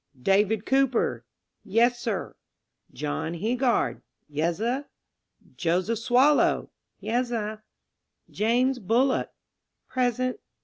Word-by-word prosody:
"David 200 - +2
Cooper."... 265 -2 +1 0.4
"Yes, 235 +4 +2
sir." 225 -5 -3 0.6
"John 75 - -3
Heegard."... 240 +7 0 0.3
"Yezzer." 175 - -1 0.7
"Joseph 185 +5 0
Swallow."... 255 +5 +3 0.3
"Yesser." 225 -3 -2 0.7
"James 250 +4 +1
Bullock."... 245 +6 +1 0.6
"Present." 255 0 0
230 Hz, 75 wpm, -26 LUFS, 205-250 Hz, 0.7 s, Swallow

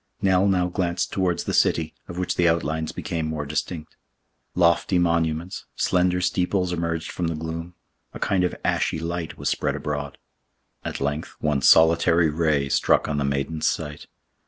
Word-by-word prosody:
Nell 95 0 +3
now 90 -2 +2
glanced 90 -1 -1
towards 90 -3 0
the - - -3
city, - - +2
of 85 - -8
which 90 - -1
the 85 -1 +3
outlines 80 -1 -1
became 85 -7 -3
more 80 -2 -3
distinct. 75 +2 -4 0.6
Lofty 85 +1 +3
monuments, 85 0 0
slender 90 0 +1
steeples 90 0 0
emerged 85 -1 -2
from 90 - -2
the 80 - -2
gloom; 80 +2 -6 0.4
a - - -8
kind 95 -2 +1
of 90 - 0
ashy - - +1
light 85 0 -4
was - - -4
spread - - -1
abroad. 70 -1 -4 0.7
At - - -5
length 75 +3 -3
one 75 -2 0
solitary 80 +2 +5
ray 75 -3 +1
struck - - +2
on 75 -1 -1
the - - 0
maiden's 70 +3 -1
sight. 75 0 -3
85 Hz, 160 wpm, -24 LUFS, 75-90 Hz, 0.7 s, solitary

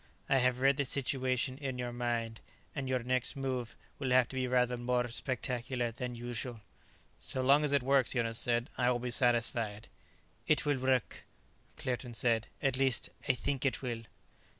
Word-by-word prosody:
I 135 - +4
have 125 0 +2
read 135 +1 +4
the 140 - +2
situation 130 0 -1
in 135 -3 -3
your 120 -1 -3
mind, 120 -2 -2 0.3
and 135 -3 -3
your 130 -2 0
next 125 0 -1
move 130 -3 -3 0.2
will 135 -2 -1
have 125 -1 +5
to - - -7
be 130 -1 0
rather 125 0 +2
more 125 0 0
spectacular 125 0 -2
than 125 +1 -5
usual." 120 -1 -4 0.6
"So 130 - -1
long 140 +3 +5
as 150 - +1
it 140 -3 +3
works," 135 -2 +3
Jonas 115 -2 0
said, 120 0 0
"I 125 0 +4
will 125 - +2
be 120 0 -3
satisfied." 115 -3 +1 0.6
"It 155 -1 +3
will 145 -2 +1
work," 130 -2 0 0.5
Claerten 125 -1 -3
said. 115 -2 +1 0.2
"At 135 -2 +2
least 135 -3 +1 0.2
I - - +7
think 135 +3 -2
it 135 0 0
will." 120 -3 -2
125 Hz, 175 wpm, -33 LUFS, 120-130 Hz, 0.6 s, I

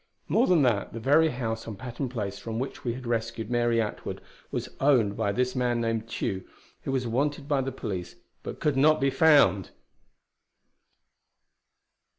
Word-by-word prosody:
More 245 - +3
than 170 -5 +4
that, 115 -6 +1
the 115 - -5
very 150 +7 +4
house 115 -4 -4
on 110 - -5
Patton 125 +4 -5
Place 100 -5 -4
from 115 -1 -5
which 130 +3 -4
we 120 -2 -2
had 130 0 -8
rescued 115 0 -2
Mary 120 -1 +2
Atwood, 110 -2 -3 0.3
was - - -3
owned 125 -8 +3
by 105 -2 0
this 125 +4 -1
man 120 -2 +1
named 115 -1 -2
Tugh, 95 -4 -2 0.4
who - - -4
was 130 -2 0
wanted 140 +5 -1
by 145 -3 +2
the 135 +1 -3
police 90 -9 -5 0.3
but - - -7
could 150 -2 +1
not 155 +3 +4
be 135 +1 +2
found! 140 - +4
120 Hz, 165 wpm, -27 LUFS, 110-135 Hz, 0.4 s, than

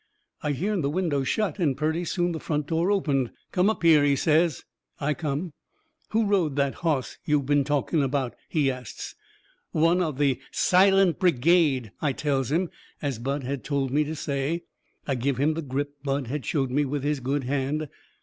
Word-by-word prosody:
I 150 -1 0
hearn 190 +7 -1
the 140 - 0
window 155 -4 0
shut 200 +3 -1
and 145 -7 +1
purty 160 +4 0
soon 175 +1 0
the 160 - -4
front 150 -2 -2
door 165 +4 0
opened. 145 - +1 0.2
"Come 185 +2 +3
up 220 - -2
here," 160 -3 +6
he 140 -1 +3
says. 160 +2 +2 0.4
I 150 +1 0
come. 155 +1 -3 0.6
"Who 225 0 +2
rode 185 -8 +1
that 140 -1 +1
hoss 155 -7 -1
yo' 150 -1 +2
been 145 +1 +2
talking 145 +2 0
about?" 135 -2 -1 0.2
he 145 -5 +2
asts. 125 -1 -7 0.6
"One 165 +3 +3
of 155 -6 -1
the 140 -3 +2
SILENT 190 -1 +4
BRIGADE," 155 - +3
I 145 -3 +1
tells 135 -2 -1
him, 170 +3 +1 0.3
as 140 -6 -3
Bud 135 +3 -2
had 135 +1 -4
told 135 -2 -1
me 150 +3 +3
to 155 +2 -4
say. 145 +3 -2 0.4
I 140 - 0
give 130 +1 -1
him 145 +4 +2
the 165 - -3
grip 145 0 -3
Bud 140 -1 -1
had 135 +3 -4
showed 135 -4 0
me 145 +3 +2
with 140 0 -2
his 145 -1 0
good 135 +2 -1
hand. 140 +3 -1
145 Hz, 190 wpm, -26 LUFS, 135-165 Hz, 0.6 s, here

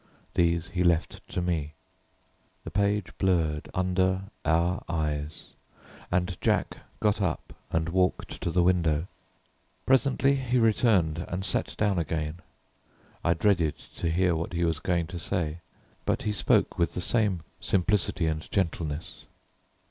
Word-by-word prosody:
These 85 0 +2
he 90 +1 0
left 85 -2 +1
to 90 - -2
me. 80 -4 -1 0.9
The 80 - -7
page 100 +1 0
blurred 80 -5 +1
under 95 +2 +1
our 85 +2 +2
eyes, 75 -1 -2 0.6
and 90 0 -1
Jack - - +1 0.2
got 105 -1 +2
up 90 - -2 0.2
and 80 0 +1
walked 90 +1 0
to - - -1
the 90 +1 +3
window. 85 -3 +2 0.8
Presently 135 +2 +3
he 130 -1 0
returned 100 -8 +3
and 90 +2 -3
sat 90 - -2
down 100 -4 +2
again. 80 0 -2 0.8
I 85 - +3
dreaded 85 -4 +2 0.2
to 85 - 0
hear 90 +1 +2
what 85 +2 -3
he 85 0 0
was 80 -2 0
going 85 -2 0
to 90 +1 -6
say, 85 -3 -2 0.4
but - - 0
he 105 - 0
spoke - - +2
with 85 - +1
the - - -1
same 100 -3 +1 0.2
simplicity 95 -2 +1
and 80 -1 -2
gentleness. 80 -5 -2
90 Hz, 140 wpm, -28 LUFS, 80-95 Hz, 0.9 s, the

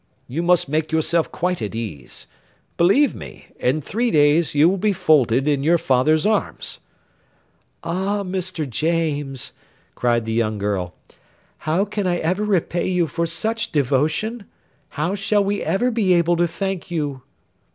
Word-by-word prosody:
You 140 +7 -3
must 175 -2 +3
make 155 +3 -1
yourself 160 +1 +1
quite 180 +1 -1
at 105 0 -4
ease; 100 - -6 0.5
believe 200 +12 +4
me, - - -11
in 130 +5 +1
three 235 - -1
days 150 -2 +3
you 150 +3 +6
will 190 +2 +1
be 210 +1 +2
folded 140 -7 +3
in 145 -2 +2
your 165 +4 +3
father's 155 +2 +2
arms." 215 0 -1 1.0
"Ah! 190 +4 -1
Mr. 185 -4 -3
James," 145 -1 -1 0.4
cried 120 -2 0
the 110 - -2
young 110 -2 0
girl, 100 -3 -2 0.7
"how 180 +6 +2
can 205 -2 -2
I 175 -1 +1
ever 180 +5 -1
repay 180 -4 0
you 180 -2 +1
for 170 +1 -2
such 220 +8 -2
devotion? 150 - 0 0.5
How 160 +6 0
shall 205 +1 +1
we 200 +1 -1
ever 245 +6 +1
be 210 -6 +2
able 170 0 +3
to 175 0 +2
thank 190 +1 -4
you?" 145 -6 -3
165 Hz, 150 wpm, -21 LUFS, 145-190 Hz, 1.0 s, you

